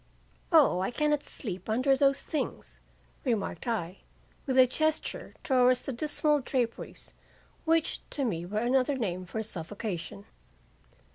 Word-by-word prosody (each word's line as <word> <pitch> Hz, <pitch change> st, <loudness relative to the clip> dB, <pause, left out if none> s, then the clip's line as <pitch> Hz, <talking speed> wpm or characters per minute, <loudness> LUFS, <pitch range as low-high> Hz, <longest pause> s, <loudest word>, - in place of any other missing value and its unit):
"'O 305 Hz, -, +6 dB
I 190 Hz, -, 0 dB
cannot 300 Hz, +3 st, +1 dB
sleep 190 Hz, -, -6 dB
under 255 Hz, +5 st, +3 dB
those 275 Hz, 0 st, +3 dB
things,' 310 Hz, -, -4 dB, 0.4 s
remarked 230 Hz, -2 st, -2 dB
I, 190 Hz, -6 st, -2 dB, 0.5 s
with 260 Hz, -1 st, +1 dB
a 260 Hz, -, +9 dB
gesture 310 Hz, +5 st, -1 dB
towards 255 Hz, -2 st, +4 dB
the 270 Hz, -, -3 dB
dismal 300 Hz, +3 st, +1 dB
draperies 245 Hz, -3 st, -3 dB, 0.5 s
which 325 Hz, -1 st, +2 dB
to 280 Hz, -, -1 dB
me 170 Hz, -8 st, -1 dB
were 195 Hz, +4 st, -4 dB
another 255 Hz, +4 st, +2 dB
name 185 Hz, -6 st, -3 dB
for 220 Hz, +5 st, -3 dB
suffocation. 195 Hz, 0 st, -5 dB
245 Hz, 130 wpm, -29 LUFS, 205-280 Hz, 0.5 s, a